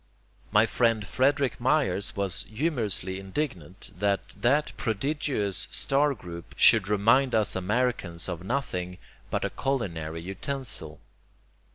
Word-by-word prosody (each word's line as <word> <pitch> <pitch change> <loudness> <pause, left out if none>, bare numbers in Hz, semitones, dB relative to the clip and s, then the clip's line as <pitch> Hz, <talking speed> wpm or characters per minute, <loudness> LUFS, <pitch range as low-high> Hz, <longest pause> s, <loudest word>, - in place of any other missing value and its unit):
My 105 +1 +5
friend 115 -2 +1
Frederick 135 +4 +1
Myers 125 -8 +1
was 100 -3 -2
humorously 110 - -1
indignant 95 - -4
that 100 +1 0
that 145 +5 +1
prodigious 115 -3 -1
star 140 +1 +1
group 85 -5 -10
should 95 - +6
remind 115 +6 +3
us 110 -3 +2
Americans 95 -3 0
of 90 -2 -5
nothing 90 -7 -2 0.3
but - - -1
a - - -2
culinary 85 - -2
utensil. 95 - -4
105 Hz, 110 wpm, -27 LUFS, 95-135 Hz, 0.3 s, should